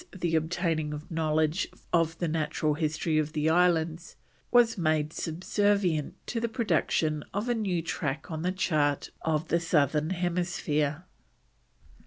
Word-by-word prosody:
the 170 Hz, -2 st, 0 dB
obtaining 160 Hz, -2 st, 0 dB
a 150 Hz, -, -6 dB
knowledge 160 Hz, +2 st, +1 dB, 0.3 s
of 165 Hz, -1 st, +2 dB
the 175 Hz, -, -1 dB
natural 155 Hz, -1 st, 0 dB
history 155 Hz, +1 st, 0 dB
of 155 Hz, 0 st, -2 dB
the 150 Hz, 0 st, 0 dB
islands, 165 Hz, 0 st, +2 dB, 0.3 s
was 240 Hz, -2 st, +5 dB
made 155 Hz, -3 st, 0 dB
subservient 180 Hz, -1 st, 0 dB
to 235 Hz, -, -2 dB
the 230 Hz, 0 st, -1 dB
production 165 Hz, -, 0 dB
of 205 Hz, +4 st, -1 dB
a 240 Hz, -, +2 dB
new 190 Hz, -7 st, -1 dB
track 150 Hz, -2 st, -3 dB
on 155 Hz, -1 st, -3 dB
the 180 Hz, +2 st, 0 dB
chart 155 Hz, -7 st, 0 dB
of 160 Hz, 0 st, -1 dB
the 170 Hz, -, +3 dB
Southern 155 Hz, -2 st, +2 dB
Hemisphere. 175 Hz, -3 st, -1 dB
160 Hz, 140 wpm, -28 LUFS, 155-180 Hz, 0.3 s, was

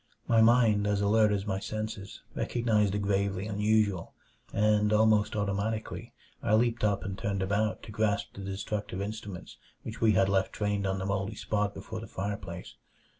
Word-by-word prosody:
My 115 Hz, -1 st, +5 dB
mind, 110 Hz, -3 st, +5 dB
as 105 Hz, -1 st, +1 dB
alert 105 Hz, +1 st, +4 dB
as 100 Hz, -1 st, -1 dB
my 95 Hz, -2 st, -1 dB
senses, 110 Hz, -1 st, -5 dB
recognized 110 Hz, -4 st, +1 dB
the -, -, +1 dB
gravely 100 Hz, -1 st, 0 dB
unusual; 105 Hz, -3 st, +1 dB, 0.4 s
and 105 Hz, 0 st, +3 dB
almost 110 Hz, 0 st, +3 dB
automatically 105 Hz, +2 st, -2 dB, 0.3 s
I 105 Hz, -, +3 dB
leaped 120 Hz, 0 st, +1 dB
up 100 Hz, -2 st, +2 dB
and 95 Hz, -1 st, -3 dB
turned 100 Hz, -2 st, -2 dB
about 105 Hz, +3 st, 0 dB
to -, -, -9 dB
grasp 105 Hz, -1 st, 0 dB
the 100 Hz, -, -8 dB
destructive 95 Hz, 0 st, -4 dB
instruments 100 Hz, -3 st, -6 dB, 0.3 s
which 110 Hz, 0 st, -7 dB
we 110 Hz, -2 st, +5 dB
had 95 Hz, 0 st, +4 dB
left 95 Hz, -1 st, +1 dB
trained 105 Hz, -1 st, -1 dB
on 95 Hz, 0 st, 0 dB
the 95 Hz, -, -3 dB
moldy 100 Hz, +2 st, -1 dB
spot 105 Hz, -1 st, -1 dB
before 110 Hz, +3 st, -6 dB
the 110 Hz, -, -8 dB
fireplace. 95 Hz, -3 st, -5 dB
105 Hz, 170 wpm, -29 LUFS, 100-110 Hz, 0.4 s, My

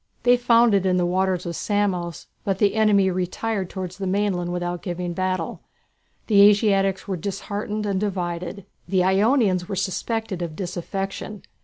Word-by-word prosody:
They 245 Hz, 0 st, +6 dB
found 235 Hz, -2 st, +4 dB
it 195 Hz, -2 st, +3 dB
in 185 Hz, -1 st, +2 dB
the 180 Hz, -, +2 dB
waters 185 Hz, 0 st, 0 dB
of 170 Hz, -1 st, -4 dB
Samos, 185 Hz, -5 st, -1 dB, 0.2 s
but 195 Hz, -2 st, 0 dB
the 200 Hz, 0 st, +3 dB
enemy 205 Hz, -3 st, +3 dB
retired 185 Hz, +2 st, -2 dB
towards 185 Hz, -1 st, -6 dB
the 195 Hz, -, -2 dB
mainland 185 Hz, -2 st, 0 dB
without 175 Hz, 0 st, -3 dB
giving 175 Hz, -1 st, -4 dB
battle. 185 Hz, -2 st, -2 dB, 0.6 s
The 205 Hz, -3 st, +5 dB
Asiatics 200 Hz, -2 st, +4 dB
were 190 Hz, -2 st, -2 dB
disheartened 205 Hz, +3 st, -4 dB
and 195 Hz, -2 st, 0 dB
divided. 180 Hz, -1 st, -3 dB, 0.2 s
The 185 Hz, -2 st, +2 dB
Ionians 195 Hz, -1 st, +2 dB
were 195 Hz, -, -2 dB
suspected 190 Hz, +1 st, -2 dB
of 165 Hz, -3 st, -4 dB
disaffection. 195 Hz, +3 st, -5 dB
190 Hz, 155 wpm, -23 LUFS, 180-205 Hz, 0.6 s, They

